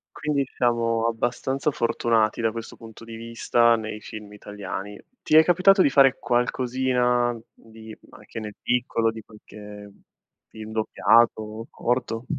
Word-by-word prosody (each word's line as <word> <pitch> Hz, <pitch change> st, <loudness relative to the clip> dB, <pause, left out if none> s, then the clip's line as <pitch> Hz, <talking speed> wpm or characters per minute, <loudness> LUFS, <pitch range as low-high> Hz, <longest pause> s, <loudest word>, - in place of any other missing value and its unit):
Quindi 145 Hz, -2 st, -1 dB
siamo 115 Hz, -1 st, +1 dB
abbastanza 125 Hz, +5 st, -1 dB
fortunati 115 Hz, -2 st, 0 dB
da 115 Hz, -1 st, +1 dB
questo 115 Hz, 0 st, -8 dB
punto 115 Hz, 0 st, -13 dB
di 115 Hz, 0 st, -9 dB
vista 115 Hz, +1 st, +2 dB
nei 110 Hz, -1 st, -6 dB
film 105 Hz, -1 st, -10 dB
italiani. 105 Hz, 0 st, -7 dB, 0.2 s
Ti 155 Hz, -, +3 dB
è 160 Hz, -, +8 dB
capitato 185 Hz, +3 st, +4 dB
di 145 Hz, -, +4 dB
fare 135 Hz, -1 st, +4 dB
qualcosina 125 Hz, -1 st, 0 dB
di 110 Hz, -1 st, -13 dB
anche -, -, -10 dB
nel 105 Hz, -1 st, -8 dB
piccolo, 120 Hz, -2 st, 0 dB
di 110 Hz, 0 st, -9 dB
qualche 105 Hz, -1 st, -13 dB, 0.6 s
film 110 Hz, 0 st, -10 dB
doppiato, 110 Hz, 0 st, +1 dB
corto? 120 Hz, -1 st, -2 dB
115 Hz, 130 wpm, -24 LUFS, 110-125 Hz, 0.6 s, è